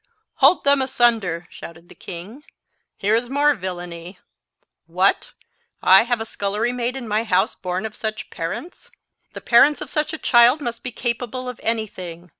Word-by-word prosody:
"Hold 290 +6 +5
them 280 -1 +4
asunder," 225 -10 +1
shouted 170 +1 -12
the - - -14
king. 195 +11 -10 0.5
"Here 205 +2 0
is 235 +2 0
more 290 +2 +3
villany! 180 -3 -7 0.7
What! - - +1 0.5
have 230 +6 +5
I - - -2
a - - -11
scullery 210 +3 -2
maid 250 +1 -2
in 255 -3 -6
my 215 +1 0
house 190 -4 +1
born 185 +2 -4
of 220 - -6
such 220 +2 -5
parents? 170 - -7 0.4
The - - -8
parents 285 +5 +4
of - - -7
such 300 -1 0
a 315 - -5
child 240 +1 +5
must 240 -5 -5
be 250 - -5
capable 245 +2 -4
of 250 -2 -7
any 225 -1 0
thing. 180 -3 -10
230 Hz, 170 wpm, -21 LUFS, 185-250 Hz, 0.7 s, Hold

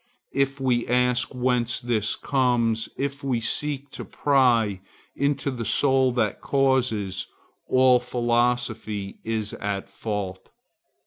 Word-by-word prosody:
If 135 0 0
we 125 -3 +1
ask 125 +1 +2
whence 125 -2 0
this 110 -3 0
comes, 120 -5 +1
if 140 0 -3
we 130 -4 0
seek 140 +3 -3
to - - -7
pry 120 -8 +2 0.3
into 140 0 0
the 120 -3 -4
soul 130 +1 +3
that 110 -4 0
causes, 130 -8 0 0.4
all 130 -1 +5
philosophy 120 -4 -1
is 110 -2 -2
at 100 -1 -3
fault. 100 -4 -5
125 Hz, 115 wpm, -25 LUFS, 110-130 Hz, 0.4 s, all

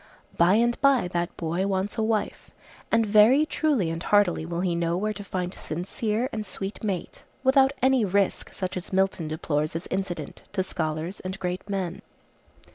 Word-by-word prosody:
By 175 +3 +5
and 235 +1 +2
by 275 -8 +4
that 175 0 -2
boy 170 +4 -1
wants 195 +1 -1
a 225 - -1
wife, 220 -1 -1 0.4
and 230 0 +4
very 220 +8 +6
truly 280 - +1
and 165 0 -4
heartily 180 -5 +2
will 170 0 -2
he 180 -2 0
know 170 0 0
where 215 +3 -1
to 205 0 -7
find 185 -2 -3
a - - -9
sincere 210 +8 -2
and 215 -1 -2
sweet 195 +1 -6
mate, 195 -5 -3 0.2
without 265 0 +5
any 260 -2 +4
risk 200 0 0
such 185 -2 -4
as 180 - -6
Milton 190 -4 +1
deplores 155 0 -1
as 165 - -3
incident 180 -6 -3
to 190 -2 +1
scholars 160 +1 -3
and 185 +1 -5
great 180 +2 -4
men. 190 -3 -3
190 Hz, 180 wpm, -26 LUFS, 175-215 Hz, 0.4 s, very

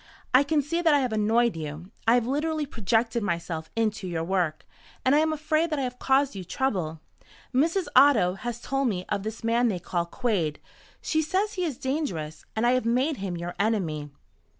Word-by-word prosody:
"I 255 - +8
can 290 +1 +1
see 335 +5 -1
that 320 -3 +4
I 285 - +3
have 250 -4 -1
annoyed 225 +1 +2
you. 155 +4 -7 0.2
I 230 - +6
have 245 -2 +2
literally 300 +4 -1
projected 230 -1 0
myself 170 -4 -3
into 215 -4 -1
your 165 -2 -2
work, 170 -3 -1 0.4
and 260 - +5
I 295 - +5
am 315 0 +2
afraid 310 +2 0
that 305 - -1
I 275 - -1
have 250 -1 -4
caused 270 +1 +2
you 195 -2 -6
trouble. 180 -7 -2 0.5
Mrs. 330 +8 +2
Otto 255 -9 +6
has 235 +4 -5
told 270 +2 -1
me 185 -5 -2
of 200 - 0
this 220 +3 -6
man 235 +2 +2
they 205 -5 0
call 175 0 -2
Quade. 180 - -1 0.4
She 315 - +1
says 380 +7 0
he 365 -3 -1
is 290 -7 -3
dangerous. 180 - -3
And 220 +2 +1
I 240 - +5
have 255 0 +2
made 255 +6 +1
him 190 -3 -4
your 175 +1 -5
enemy." 175 -9 0
235 Hz, 200 wpm, -26 LUFS, 180-280 Hz, 0.5 s, I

